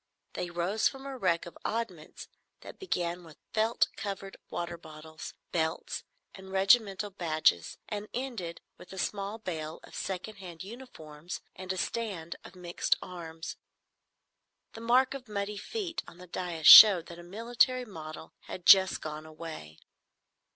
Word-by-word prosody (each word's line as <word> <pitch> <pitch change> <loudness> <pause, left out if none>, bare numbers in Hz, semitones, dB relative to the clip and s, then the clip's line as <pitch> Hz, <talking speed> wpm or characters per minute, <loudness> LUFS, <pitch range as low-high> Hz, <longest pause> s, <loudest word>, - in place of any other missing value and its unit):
They 175 - -3
rose 175 +5 +1
from 270 0 -6
a 275 -1 -5
wreck 185 -8 +1
of 170 - -10
oddments 210 -9 -4 0.3
that - - -11
began 175 - -2
with 160 -3 -14 0.2
felt 225 +1 +2
covered 195 -1 -5
water 170 0 -4
bottles, 160 -1 -10 0.2
belts, 160 -1 -2 0.3
and 190 -1 -11
regimental 195 +1 +3
badges, 155 - +1
and 210 0 -4
ended 230 -10 -4 0.2
with 180 - -13
a - - -9
small 200 +2 -2
bale 160 -7 -5
of - - -15
second 195 +3 -4
hand 175 -3 -9
uniforms 180 - -9
and 185 0 -5
a 185 - -3
stand 185 -7 -3
of - - -13
mixed 175 -1 0
arms. 165 -2 -7 1.2
The 225 - -9
mark 250 +3 +4
of 265 -2 -8
muddy 205 0 -3
feet 355 - -4
on - - -13
the 180 - -11
dais 175 -3 -5
showed 190 -4 +12
that 170 0 -10
a - - -10
military 235 +6 +1
model 160 -6 -9
had 180 - -7
just 190 -1 +7
gone 155 0 -6
away. 155 - -9
185 Hz, 150 wpm, -30 LUFS, 165-215 Hz, 1.2 s, showed